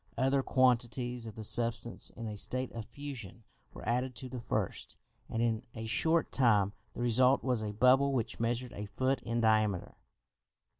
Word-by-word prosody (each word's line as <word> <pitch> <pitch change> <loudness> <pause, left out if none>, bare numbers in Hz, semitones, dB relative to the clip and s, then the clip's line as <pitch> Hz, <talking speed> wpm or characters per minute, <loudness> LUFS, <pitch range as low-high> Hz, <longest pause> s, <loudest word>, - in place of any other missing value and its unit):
Other 135 +2 +2
quantities 125 -2 +1
of 110 - -8
the 110 - -6
substance 115 +1 +1
in 115 - -8
a 105 -1 -4
state 130 +5 -1
of 115 -2 -6
fusion 120 -5 -8 0.3
were - - -10
added 125 +2 0
to 130 +3 -7
the 125 - -5
first, - - -3 0.3
and 115 +1 -1
in 115 -1 +1
a 110 0 -5
short 160 +9 +1
time 105 -6 +3 0.2
the - - -5
result 125 +3 +4
was 125 -4 0
a 105 -1 -3
bubble 130 +6 +4
which 120 -4 -2
measured 120 +2 -1
a 105 0 -6
foot 130 +7 0
in 115 0 -1
diameter. 110 -4 +1
120 Hz, 170 wpm, -32 LUFS, 110-130 Hz, 0.3 s, result